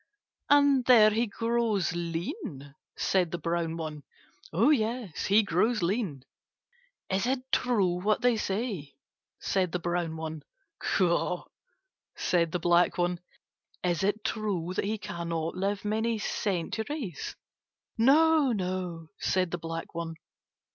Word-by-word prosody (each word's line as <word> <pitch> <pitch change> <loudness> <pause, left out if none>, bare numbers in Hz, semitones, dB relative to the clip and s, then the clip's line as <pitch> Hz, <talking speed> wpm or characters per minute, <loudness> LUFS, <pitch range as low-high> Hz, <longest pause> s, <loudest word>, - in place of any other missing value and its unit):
"And 285 -2 +5
there 220 -4 +7
he 230 +3 +1
grows 230 -4 0
lean?" 170 - -4 0.2
said 185 -3 +2
the 175 - -3
brown 165 0 -2
one. 155 -2 -5 0.5
"Yes, 225 - +1
he 210 +3 +5
grows 205 +3 +1
lean." 175 - -1 0.8
"Is 195 +4 0
it 260 0 -2
true 190 -8 +2
what 210 +3 +1
they 245 -1 +4
say?" 195 - -3 0.4
said 185 -3 0
the - - +2
brown 170 -1 -2
one. 160 -1 -5 0.4
"Caw," 180 -1 +1 0.7
said 170 -2 +1
the 180 - 0
black 175 +1 +3
one. 175 0 0 0.6
"Is 175 -3 +1
it 205 +2 0
true 190 -6 -2
that 185 - -1
he 215 +2 -1
cannot 170 -5 -3
live 200 +2 -2
many 220 +2 0
centuries?" 215 - -3 0.6
"No, 295 +3 +5
no," 180 -4 -3
said 185 -2 +1
the 175 - -3
black 165 0 -6
one. 165 -1 -4
185 Hz, 125 wpm, -29 LUFS, 170-225 Hz, 0.8 s, there